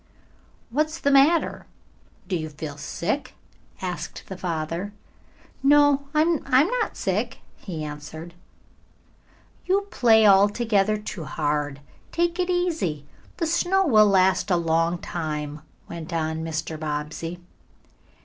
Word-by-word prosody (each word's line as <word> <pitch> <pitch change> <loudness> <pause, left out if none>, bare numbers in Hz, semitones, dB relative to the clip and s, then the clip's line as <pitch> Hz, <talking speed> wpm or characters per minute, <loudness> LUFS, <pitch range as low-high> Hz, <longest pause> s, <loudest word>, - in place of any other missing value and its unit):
"What's 310 +5 0
the 280 - +2
matter? 285 +5 +3 0.6
Do 185 - -1
you 155 -2 -3
feel 150 -1 -7
sick?" 190 - -3 0.5
asked 180 -1 -5
the 190 - -7
father. 170 +2 -3 0.7
"No, 285 0 +4
I'm 320 +1 +3
not 380 - +2
sick," - - -1 0.2
he 165 -6 -6
answered. 150 +3 -8 1.3
"You 385 +2 +3
play 220 -3 +5
altogether 205 +1 +4
too 200 -5 -6
hard. 145 -2 -2 0.3
Take 340 +1 0
it 360 0 0
easy. 325 - -1 0.3
The 335 - 0
snow 350 +4 +2
will 215 -8 +6
last 190 0 +3
a 180 - +4
long 165 +1 +1
time," 150 -3 -4 0.3
went 170 0 -7
on 160 -1 -2
Mr. 160 0 -4
Bobbsey. 155 +3 -4
185 Hz, 115 wpm, -24 LUFS, -, 1.3 s, will